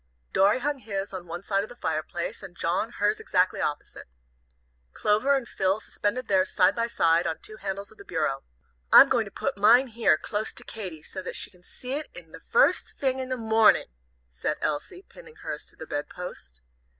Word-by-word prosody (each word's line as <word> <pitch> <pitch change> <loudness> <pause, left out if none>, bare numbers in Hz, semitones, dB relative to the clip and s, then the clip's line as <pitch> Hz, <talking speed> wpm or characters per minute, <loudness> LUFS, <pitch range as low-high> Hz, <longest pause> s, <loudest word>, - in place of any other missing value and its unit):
Dorry 200 +4 +4
hung 285 +2 -2
his 200 -4 -4
on 180 -2 -6
one 175 +2 -6
side 195 -1 +1
of 210 - -6
the 245 - -11
fireplace, 160 -3 -3
and 175 -2 -11
John 185 +7 -1
hers 210 +1 +1
exactly 180 0 +1
opposite. 145 -1 -4 0.9
Clover 215 +7 +2
and 265 -3 -2
Phil 190 +1 0
suspended 220 +3 -3
theirs 190 -1 +3
side 190 +1 +3
by 230 0 0
side, 170 -7 +2
on 160 - -2
two 215 - -10
handles 195 0 -5
of 220 - -20
the - - -10
bureau. 155 -7 -1 0.5
"I'm - - +10
going - - +2
to - - -10
put - - -3
mine 245 +6 +6
here, 225 -8 +3
close 210 +5 -3
to - - -9
Katy, 185 -8 -7
so 190 - -6
that 185 - -6
she - - -3
can 180 -2 -22
see 250 +7 -10
it 300 +2 -4
the - - -11
first - - +2
fing 265 -1 0
in 260 0 -4
the 255 - -1
mornin'," 220 - +4 0.4
said - - -2
Elsie, 360 - -3
pinning 470 -2 -15
hers - - -6
to - - -13
the - - -9
bed 145 - -4
post. 70 - -9
200 Hz, 200 wpm, -27 LUFS, 175-235 Hz, 0.9 s, I'm